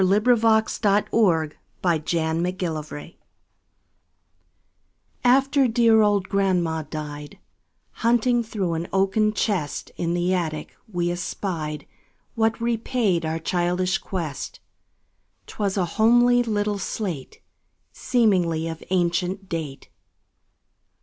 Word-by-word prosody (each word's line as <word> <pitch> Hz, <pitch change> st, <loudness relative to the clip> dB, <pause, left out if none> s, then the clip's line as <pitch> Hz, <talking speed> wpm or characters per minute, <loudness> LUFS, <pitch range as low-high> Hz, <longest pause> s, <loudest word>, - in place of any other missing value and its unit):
Eugene 190 Hz, +1 st, +4 dB, 0.2 s
Field 220 Hz, 0 st, +2 dB, 0.3 s
Little 165 Hz, -9 st, +2 dB, 0.3 s
Homer's 165 Hz, 0 st, -1 dB
Slate 150 Hz, +3 st, -9 dB, 2.1 s
AFTER 270 Hz, +2 st, +4 dB
dear 230 Hz, -1 st, +4 dB
old 205 Hz, -2 st, +2 dB
grandma 180 Hz, -5 st, +1 dB
died, 150 Hz, -1 st, -7 dB, 0.5 s
Hunting 240 Hz, +1 st, +2 dB
through 205 Hz, -6 st, -2 dB
an 165 Hz, +1 st, -3 dB
oaken 195 Hz, +3 st, +2 dB
chest 195 Hz, -8 st, -2 dB
In 170 Hz, 0 st, -1 dB
the 175 Hz, +1 st, +1 dB
attic, 160 Hz, -4 st, -3 dB, 0.2 s
we 175 Hz, -2 st, 0 dB
espied 170 Hz, -4 st, -4 dB, 0.5 s
What 225 Hz, 0 st, +1 dB
repaid 230 Hz, -6 st, 0 dB
our 160 Hz, +1 st, -1 dB
childish 180 Hz, +2 st, 0 dB
quest; 165 Hz, -7 st, -5 dB, 0.9 s
'Twas 200 Hz, -2 st, -3 dB
a 185 Hz, -, +2 dB
homely 240 Hz, +6 st, +4 dB
little 210 Hz, -3 st, -1 dB
slate, 180 Hz, -11 st, -4 dB, 0.5 s
Seemingly 180 Hz, -9 st, +1 dB
of 165 Hz, -1 st, -6 dB
ancient 180 Hz, +2 st, 0 dB
date. 155 Hz, -6 st, -5 dB
185 Hz, 95 wpm, -24 LUFS, 165-220 Hz, 2.1 s, Eugene